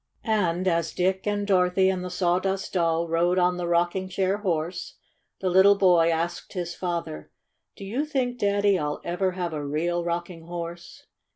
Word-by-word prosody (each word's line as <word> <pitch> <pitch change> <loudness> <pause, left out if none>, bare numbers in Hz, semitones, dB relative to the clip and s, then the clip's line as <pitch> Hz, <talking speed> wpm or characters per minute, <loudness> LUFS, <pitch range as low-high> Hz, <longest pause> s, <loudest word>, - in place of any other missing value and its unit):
And 185 -5 +1
as 165 -2 0
Dick 190 +2 0
and 205 0 0
Dorothy 190 -1 +3
and 185 -1 0
the 180 - -4
Saw 180 0 +1
dust 195 0 -3
Doll 170 -2 +1
rode 170 +2 +1
on 180 0 +2
the 175 -1 -3
rocking 175 +2 0
chair 190 +1 0
horse, 175 -2 -3 0.5
the 190 - +1
little 190 +2 +6
boy 175 -4 +4
asked 165 +1 -2
his 175 -3 -3
father: 170 - -4 0.5
"Do 195 - -9
you 240 +9 -1
think, 250 -4 -1
Daddy, 200 -1 +2
111 150 0 -3
ever 185 +1 0
have 175 -2 -3
a 150 -1 -3
real 170 +4 -1
rocking 170 -1 -4
horse?" 170 0 -7
180 Hz, 175 wpm, -25 LUFS, 170-190 Hz, 0.5 s, little